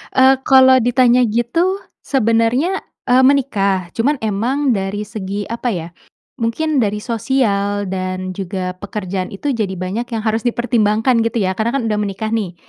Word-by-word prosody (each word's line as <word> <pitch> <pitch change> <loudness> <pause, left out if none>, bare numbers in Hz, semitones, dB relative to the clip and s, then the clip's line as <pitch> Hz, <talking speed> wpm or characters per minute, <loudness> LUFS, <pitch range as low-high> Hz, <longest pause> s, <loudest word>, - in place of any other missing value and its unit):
Eee, 265 0 +6
kalau 260 -1 +7
ditanya 245 +1 +3
gitu, 330 - 0 0.2
sebenarnya, 245 - +1 0.3
eee, 255 +1 +5
menikah. 200 -10 +1
Cuman 270 +6 +1
emang 245 +7 0
dari 200 0 -2
segi, 205 -1 -5
apa 235 +2 -3
ya, 165 -2 -4 0.5
mungkin 280 +6 0
dari 210 -2 0
sosial 215 -4 0
dan 185 0 -3
juga 185 -1 -4
pekerjaan 190 -2 -4
itu 280 +9 -2
jadi 215 -6 -2
banyak 190 +7 -4
yang 220 -1 -3
harus 220 0 0
dipertimbangkan, 230 0 +1
gitu 230 -2 0
ya, 185 - +1
karena 235 +4 0
kan 275 - 0
udah 210 -1 0
menikah 210 +1 -3
nih. 205 -6 -2
225 Hz, 150 wpm, -18 LUFS, 200-255 Hz, 0.5 s, kalau